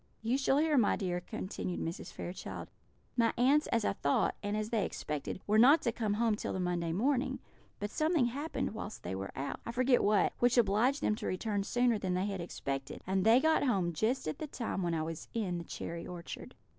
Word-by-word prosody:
"You 230 +3 +1
shall 270 0 +2
hear, 300 -2 +4
my 215 - +3
dear," 180 -2 -2
continued 180 0 -4
Mrs. 165 +2 -4
Fairchild. 180 +2 -6 0.5
"My 230 -2 +3
aunts, 275 +5 +4
as 230 -2 +1
I - - +2
thought, 140 -7 +1
and 205 +1 -1
as 215 +1 -3
they 220 -4 +2
expected, 150 0 -4
were 215 +1 +3
not 280 +8 +7
to 235 - +2
come 215 -3 -1
home 225 -1 +2
till - - -4
the - - -2
Monday 175 -2 -1
morning; 255 - +1 0.4
but 205 +1 -3
something 310 -4 +2
happened 280 +1 -2
whilst 220 -1 -7
they 90 - -4
were 95 +1 -4
out 135 +1 -3
I - - -4
forget 250 +1 +3
what 205 -1 +3
which 245 +1 +3
obliged 235 +5 +3
them - - +3
to - - -4
return 205 +2 -1
sooner 240 +1 +2
than 185 -2 -1
they 185 +2 0
had 195 -3 -3
expected, 135 -5 -5
and 190 0 +1
they 225 +4 +6
got 315 +3 +3
home 190 -10 +1
just 220 - 0
at 155 - -3
the 310 - -4
time 235 -8 -3
when 170 -2 0
I 160 - 0
was 165 0 -5
in 185 -6 -1
the - - -6
cherry 170 +1 -6
orchard. 175 -1 -8
210 Hz, 220 wpm, -32 LUFS, 180-245 Hz, 0.5 s, not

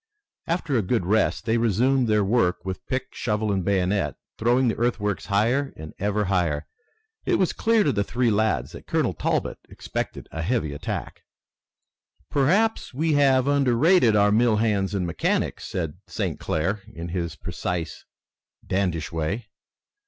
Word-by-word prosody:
After 165 -4 -1
a 115 - +3
good 95 0 0
rest 110 +4 +1
they 115 0 +2
resumed 120 +3 +2
work 105 -3 +2
with 95 -1 -4
pick, 130 0 -3
shovel, 105 -2 -1
and 95 -2 0
bayonet, 95 +1 +1 0.2
throwing 120 +3 +3
the 115 - +1
earthworks 105 -5 -1
higher 120 +8 +1
and 80 -1 -9
ever 105 +1 0
higher. 85 -6 0 0.6
It - - +1
was 185 - +1
clear 225 -1 +3
to 145 - +2
the 100 - 0
three 120 +3 +1
lads 105 - +1
that - - -11
Colonel - - +1
Talbot - - -1
expected - - -5
a 80 - -4
heavy 90 - -1
attack. 70 - -5 1.1
"Perhaps 185 - +2
we 160 +3 +1
have 135 -3 +4
underrated 140 - +4
our 105 0 +4
mill 115 +1 +4
hands 105 -3 +1
and 95 -2 0
mechanics," 85 - -1
said 80 -2 -4
St. - - -3
Clair, 95 +7 -1
in 85 +1 -7
his 85 -2 -3
precise, 85 +1 -4 0.6
dandyish 90 -5 -1
way. 90 +8 -3
105 Hz, 150 wpm, -24 LUFS, 90-125 Hz, 1.1 s, have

